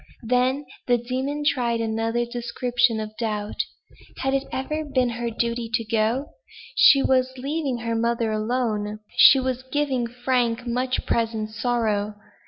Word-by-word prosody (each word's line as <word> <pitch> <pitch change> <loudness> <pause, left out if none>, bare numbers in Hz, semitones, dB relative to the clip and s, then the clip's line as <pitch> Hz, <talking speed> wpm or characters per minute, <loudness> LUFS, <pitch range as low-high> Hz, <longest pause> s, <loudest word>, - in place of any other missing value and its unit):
Then 255 +4 +1 0.2
the 245 -1 +4
demon 260 +5 -3
tried 240 -5 +1
another 225 +1 0
description 240 -1 0
of 215 0 -6
doubt. 210 -2 -3 0.6
"Had 270 0 -1
it 275 0 0
ever 305 +4 -2
been 260 -4 +1
her 240 0 -3
duty 235 0 -2
to 230 - 0
go? 225 +5 +1 0.5
She 275 -2 +7
was 260 0 +1
leaving 275 0 -2
her 230 0 -2
mother 230 0 0
alone. 215 -1 -1 0.2
She 270 - +9
was 260 -1 -2
giving 260 -2 -1
Frank 245 -1 0
much 250 +2 -1
present 225 -2 -1
sorrow. 215 -2 -1
240 Hz, 140 wpm, -24 LUFS, 225-260 Hz, 0.6 s, She